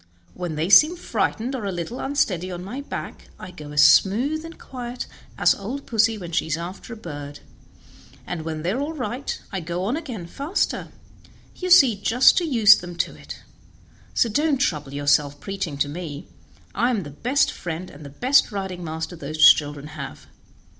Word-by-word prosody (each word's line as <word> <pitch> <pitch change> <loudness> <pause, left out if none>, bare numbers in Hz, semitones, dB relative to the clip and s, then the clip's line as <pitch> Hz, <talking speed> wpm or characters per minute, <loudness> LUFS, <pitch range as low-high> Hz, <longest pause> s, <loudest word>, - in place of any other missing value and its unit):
When 175 -3 -5
they 155 +2 -1
seem 305 - +7
frightened 255 -7 -2
or 255 -5 -4
a 200 - -2
little 175 +8 -5
unsteady 190 - 0
on 180 -1 -6
my 240 +9 -6
back 285 - -7
I 185 - -9
go 150 -4 -10
as 150 0 +5
smooth 255 - +4
and 330 0 -9
as - - -26
quiet 245 -1 -6 0.3
as - - +5
old 245 +8 -6
pussy 225 -1 +2
when 175 -4 -8
she 165 - 0
is 160 0 -1
after 180 +7 -8
a 230 - -7
bird; 145 -7 -8 0.8
and 175 -2 -4
when 155 -1 -5
they 175 - 0
are 240 - -2
all 295 +3 -3
right 255 -1 -4
I 195 - -2
go 175 +2 -4
on 220 +8 0
again 255 - -6
faster, 285 - -2 0.7
you 365 - -4
see, 270 - +7
just 230 +6 +4
to 350 - -2
use 225 -8 +7
them 175 0 -8
to - - -2
it; - - -11 0.7
so 240 - +3
don't 295 +7 +1
you - - +2
trouble 150 - -1
yourself 145 0 +1
preaching 195 -6 -4
to 145 - +1
me; 150 -1 -7 0.5
I 240 - +1
am 220 -6 -1
the 145 - -9
best 250 - +1
friend 175 +1 -6
and 145 +1 -13
the 140 - -9
best 255 - +3
riding 190 -3 -5
master 160 +2 -5
those 155 0 +6
children 145 -1 -6
have. - - -8
190 Hz, 195 wpm, -23 LUFS, 160-250 Hz, 0.8 s, seem